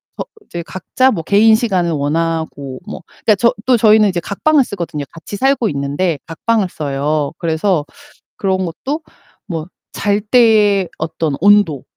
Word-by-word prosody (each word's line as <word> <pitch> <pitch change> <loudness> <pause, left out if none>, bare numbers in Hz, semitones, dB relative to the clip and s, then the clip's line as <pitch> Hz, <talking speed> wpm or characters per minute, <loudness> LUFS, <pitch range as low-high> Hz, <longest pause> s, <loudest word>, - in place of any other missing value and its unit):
거 - - -5 0.2
이제 170 - -6
각자 255 +9 0
뭐 170 - -2
개인 210 +5 +4
시간을 190 -7 0
원하고 150 -3 -2
뭐 - - -7
그러니까 215 - 0
저 235 +4 +2
또 255 -2 +5
저희는 215 -1 +5
이제 180 -2 -1
각방을 280 - +2
쓰거든요. 170 -8 -5
같이 165 +5 -9
살고 265 -2 +1
있는데 145 +4 -1
각방을 200 +4 0
써요. 145 0 -2
그래서 165 0 0 0.5
그런 190 -2 0
것도 265 - -4 0.5
뭐 165 -4 -4 0.3
잘 205 0 0
때의 210 -4 +3
어떤 160 -1 -2
온도. 200 -8 +4
185 Hz, 300 characters per minute, -16 LUFS, 160-215 Hz, 0.5 s, 또